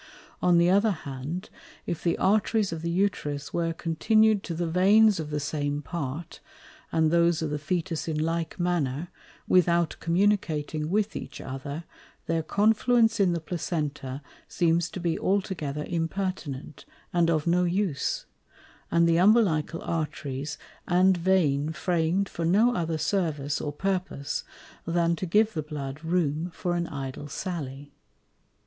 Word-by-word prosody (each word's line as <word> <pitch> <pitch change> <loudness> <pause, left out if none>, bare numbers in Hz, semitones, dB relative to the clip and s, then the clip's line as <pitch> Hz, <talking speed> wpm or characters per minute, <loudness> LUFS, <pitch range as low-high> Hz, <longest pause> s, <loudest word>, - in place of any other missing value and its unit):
On 175 -1 +4
the 170 0 +5
other 200 +4 +4
hand, 155 +1 -5 0.3
if 170 - -4
the 170 -1 +1
Arteries 210 0 +2
of 160 - -5
the 170 - -2
Uterus 170 -6 -1
were 165 -1 0
continued 210 +6 +2
to 170 - -5
the 175 +1 -1
Veins 195 +4 +5
of 155 -2 -4
the 150 0 -2
same 145 0 -2
part, 150 +1 -5 0.5
and 160 -1 +2
those 170 -1 +3
of 155 - -2
the 150 - -2
Fœtus 165 +2 -2
in 160 -2 -1
like 165 +2 -2
manner, 170 -3 -1 0.4
without 170 -2 +3
communicating 165 -4 0
with 210 +2 0
each - - -7
other, 140 +4 -6 0.4
their 165 0 0
Confluence 225 +5 +3
in 185 -3 +4
the 170 - -1
Placenta 150 -5 -4 0.2
seems 170 0 +1
to - - -6
be 170 -2 -1
altogether 165 -7 -1
impertinent, 165 -5 -3 0.3
and 170 -1 +3
of 155 -3 +1
no 175 +1 +3
use, 180 -4 -1 0.6
and 170 0 +4
the 165 0 +3
Umbilical 180 -5 +3
Arteries 150 -3 -3 0.3
and 185 +2 +4
Vein 165 -5 +2
fram'd 175 +3 0
for 170 - -5
no 210 +9 +4
other 165 -6 -1
Service 155 -4 -1
or 145 - -3
Purpose, 180 -3 -2 0.4
than 170 0 +1
to 185 +3 -4
give 215 +5 +3
the 155 - -2
Blood 150 -1 -6
room 165 -1 0
for 175 -1 -1
an 170 -1 -1
idle 135 +1 -6
Sally. 145 -4 -5
170 Hz, 145 wpm, -27 LUFS, 150-185 Hz, 0.6 s, the